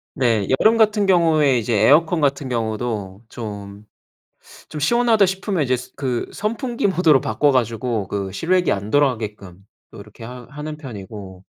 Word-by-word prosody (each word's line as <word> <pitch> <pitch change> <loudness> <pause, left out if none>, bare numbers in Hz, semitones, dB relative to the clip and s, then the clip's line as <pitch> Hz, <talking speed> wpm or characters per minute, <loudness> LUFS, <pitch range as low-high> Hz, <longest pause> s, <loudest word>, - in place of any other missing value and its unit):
네. 115 -6 +1
여름 220 +1 +5
같은 215 -2 +3
경우에 160 -8 +3
이제 115 0 -1
에어컨 160 +4 +4
같은 140 -2 0
경우도 110 -4 -3
좀, 100 -2 -8 0.8
좀 150 - -6
시원하다 230 +5 +3
싶으면 190 -2 -1
이제 130 -1 +1 0.2
그 130 -3 -3
선풍기 235 +3 -3
모드로 170 -8 +3
바꿔 140 +7 +1
가지고 115 -4 -1
그 100 -1 -4
실외기 180 - +1
안 100 +2 -3
돌아가게끔 105 -9 -1 0.2
또 - - -13
이렇게 105 +3 -13
하 125 +1 -9
하는 150 +1 -7
편이고 100 -8 -10
130 Hz, 315 characters per minute, -20 LUFS, 105-165 Hz, 0.8 s, 여름